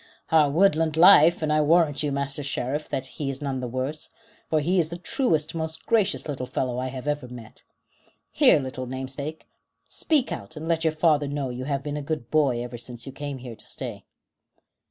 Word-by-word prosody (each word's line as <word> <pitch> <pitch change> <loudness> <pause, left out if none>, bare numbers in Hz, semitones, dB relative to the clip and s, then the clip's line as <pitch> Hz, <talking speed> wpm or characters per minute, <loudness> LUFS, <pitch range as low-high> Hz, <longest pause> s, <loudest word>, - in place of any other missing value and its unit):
"Our 155 -3 +5
woodland 160 -1 +3
life; 170 -1 +7
and 150 -1 +1
I 155 - +3
warrant 155 -1 +3
you, 150 -2 -1
Master 140 +1 -2
Sheriff, 140 +1 -3
that 130 - -2
he 140 +1 -5
is 135 -1 -4
none 135 -3 -3
the 125 - -3
worse, 130 +5 -4 0.4
for 155 - +2
he 175 +5 +1
is 160 -2 +1
the 170 - -5
truest, 165 - 0
most 160 -1 -5
gracious 210 -6 +1
little 130 -4 -4
fellow 125 -1 -2
I 130 - -2
ever 135 +1 -3
met. 120 -3 -11 0.7
Here, - - +6
Little 130 -1 -5
Namesake, 135 +4 -5 0.4
speak 295 -5 0
out, 160 - -6
and 160 +2 -6
let 165 -1 +1
your 160 - +3
father 155 -2 +2
know 140 -2 -3
you 125 +1 -5
have 140 -1 -2
been 145 0 -3
a - - -3
good 145 -4 -4
boy 135 -6 +2
ever 120 -1 -7
since 120 0 -8
you 135 - -7
came 145 0 -5
here 125 -2 -8
to - - -14
stay." - - -6
145 Hz, 200 wpm, -25 LUFS, 130-160 Hz, 0.7 s, life